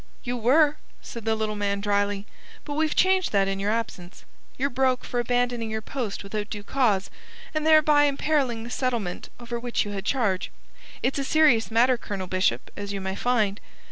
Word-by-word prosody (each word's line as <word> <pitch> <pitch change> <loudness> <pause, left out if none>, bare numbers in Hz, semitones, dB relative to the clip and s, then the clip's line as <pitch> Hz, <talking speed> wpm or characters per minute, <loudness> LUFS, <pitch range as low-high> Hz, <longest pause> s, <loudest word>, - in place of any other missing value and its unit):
"You 245 0 -2
were," 290 +6 +4 0.3
said 230 -2 -8
the 220 0 +2
little 215 -1 -2
man 200 -1 -1
dryly. 205 0 0 0.4
"But 290 - -4
we've 310 +1 0
changed 375 -1 +3
that 195 -1 +3
in 195 0 -2
your 200 +1 -1
absence. 210 -5 -4 0.3
You're 280 +2 0
broke 255 0 +1
for 245 - -2
abandoning 245 -1 0
your 220 0 -3
post 225 -6 -4
without 210 +1 -4
due 205 -2 -6
cause, 210 -6 +1 0.4
and 310 0 -1
thereby 305 -2 +6
imperiling 275 -5 0
the 240 - -8
settlement 235 -9 -2
over 240 0 -5
which 240 -1 -1
you 205 - -5
had 195 -1 -4
charge. 210 -5 0 0.5
It's 270 +2 0
a - - 0
serious 290 -6 +4
matter, 240 +2 +3
Colonel 195 -4 -5
Bishop, 185 +1 0
as 200 0 -5
you 200 - -3
may 190 0 -3
find. 215 -4 0
230 Hz, 185 wpm, -25 LUFS, 205-265 Hz, 0.5 s, thereby